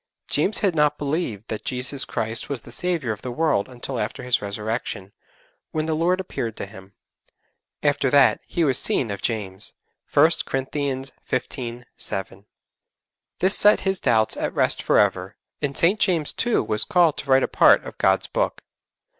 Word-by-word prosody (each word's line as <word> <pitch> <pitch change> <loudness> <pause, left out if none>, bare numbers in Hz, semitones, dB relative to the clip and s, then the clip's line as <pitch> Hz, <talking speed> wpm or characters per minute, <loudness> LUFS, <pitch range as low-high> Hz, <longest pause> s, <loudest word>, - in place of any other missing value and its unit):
James 190 +9 +1
had 190 - +2
not 150 -1 +2
believed 140 - -3
that 110 - -5
Jesus 130 +2 -2
Christ 110 +1 -2
was 140 -5 -3
the 120 - -13
Saviour 160 -5 -1
of 105 - -12
the 130 - -5
world 140 -5 0
until 125 0 -4
after - - -4
His 125 -1 +1
Resurrection, 100 -1 -4 0.6
when 155 0 -1
the 160 - -1
Lord 175 +4 +1
appeared 115 - -4
to - - -4
him. 95 -1 -14 0.9
'After 145 -2 +2
that, 140 0 +4
He 170 - -1
was 135 -5 +2
seen 115 -5 0
of 100 - -5
James.' 100 -4 -3 0.4
(1 155 +3 +5
Corinthians 135 0 -3 0.2
xv. 125 -1 -3
7.) 95 +1 -5 1.0
This 190 +3 +5
set 210 +1 +6
his 190 -1 0
doubts 110 -4 +2
at - - -3
rest - - +2
for - - +2
ever, - - +1 0.3
and 140 -2 -2
St. 190 +6 +3
James 170 -6 +1
too 240 -1 +1
was 105 - +3
called 175 -6 +3
to 140 - -7
write 130 0 +5
a - - +1
part - - +5
of - - -10
God's - - +3
Book. - - -2
135 Hz, 170 wpm, -23 LUFS, 110-160 Hz, 1.0 s, set